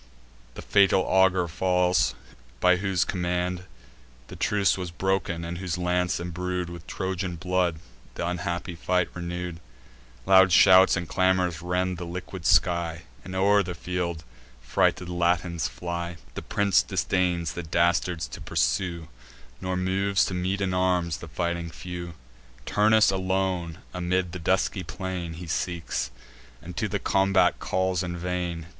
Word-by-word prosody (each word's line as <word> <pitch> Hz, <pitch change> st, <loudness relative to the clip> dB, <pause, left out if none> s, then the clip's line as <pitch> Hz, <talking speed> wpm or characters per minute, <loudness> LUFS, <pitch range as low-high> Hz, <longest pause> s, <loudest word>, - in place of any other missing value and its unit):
The -, -, -8 dB
fatal 100 Hz, -1 st, +4 dB
augur 95 Hz, -2 st, +3 dB
falls, 90 Hz, 0 st, +2 dB, 0.4 s
by 90 Hz, 0 st, +4 dB
whose 95 Hz, -3 st, 0 dB
command 90 Hz, 0 st, -2 dB, 0.6 s
The -, -, -8 dB
truce 100 Hz, -2 st, +2 dB
was 90 Hz, -2 st, -4 dB
broken, 90 Hz, -1 st, -1 dB
and 85 Hz, +1 st, -5 dB
whose 90 Hz, -2 st, -3 dB
lance, 90 Hz, -2 st, 0 dB
embrued 90 Hz, +1 st, -3 dB
With 85 Hz, -1 st, -10 dB
Trojan 95 Hz, -1 st, -3 dB
blood, 90 Hz, -1 st, 0 dB, 0.4 s
th' -, -, -13 dB
unhappy 90 Hz, 0 st, -3 dB
fight 90 Hz, +1 st, 0 dB
renew'd. 90 Hz, -1 st, -5 dB, 0.7 s
Loud 95 Hz, -1 st, +6 dB
shouts 95 Hz, +2 st, +7 dB
and 85 Hz, -2 st, -3 dB
clamours 90 Hz, -3 st, +1 dB
rend 90 Hz, 0 st, -1 dB
the 85 Hz, -, -5 dB
liquid 90 Hz, 0 st, -5 dB
sky, 85 Hz, -2 st, +2 dB, 0.2 s
And 95 Hz, -, -7 dB
o'er 100 Hz, +2 st, +4 dB
the 90 Hz, -2 st, -4 dB
field 85 Hz, -1 st, -3 dB
the -, -, -19 dB, 0.4 s
frighted 90 Hz, -, +1 dB
Latins 85 Hz, -1 st, 0 dB
fly. 85 Hz, -1 st, -5 dB, 0.2 s
The -, -, -5 dB
prince 100 Hz, -1 st, +2 dB
disdains 90 Hz, -3 st, 0 dB
the 85 Hz, -, -4 dB
dastards 85 Hz, +1 st, +1 dB
to -, -, -9 dB
pursue, 80 Hz, +7 st, -1 dB, 0.5 s
Nor 95 Hz, 0 st, -2 dB
moves 95 Hz, +2 st, +1 dB
to -, -, -4 dB
meet 95 Hz, +2 st, -1 dB
in 95 Hz, -1 st, 0 dB
arms 90 Hz, -3 st, +1 dB
the 85 Hz, -, -10 dB
fighting 85 Hz, +1 st, -2 dB
few; 85 Hz, 0 st, -7 dB, 0.5 s
Turnus 110 Hz, 0 st, +4 dB
alone, 95 Hz, -3 st, -1 dB, 0.2 s
amid 90 Hz, 0 st, -1 dB
the 90 Hz, -, -6 dB
dusky 95 Hz, +3 st, +1 dB
plain, 90 Hz, -1 st, -5 dB
He 85 Hz, +2 st, -8 dB
seeks, 85 Hz, 0 st, -2 dB, 0.5 s
and 85 Hz, +2 st, -10 dB
to 105 Hz, -, -1 dB
the 100 Hz, 0 st, -1 dB
combat 95 Hz, 0 st, +2 dB
calls 95 Hz, -1 st, 0 dB
in 90 Hz, -1 st, -4 dB
vain. 90 Hz, -2 st, -3 dB
90 Hz, 145 wpm, -26 LUFS, 85-95 Hz, 0.7 s, shouts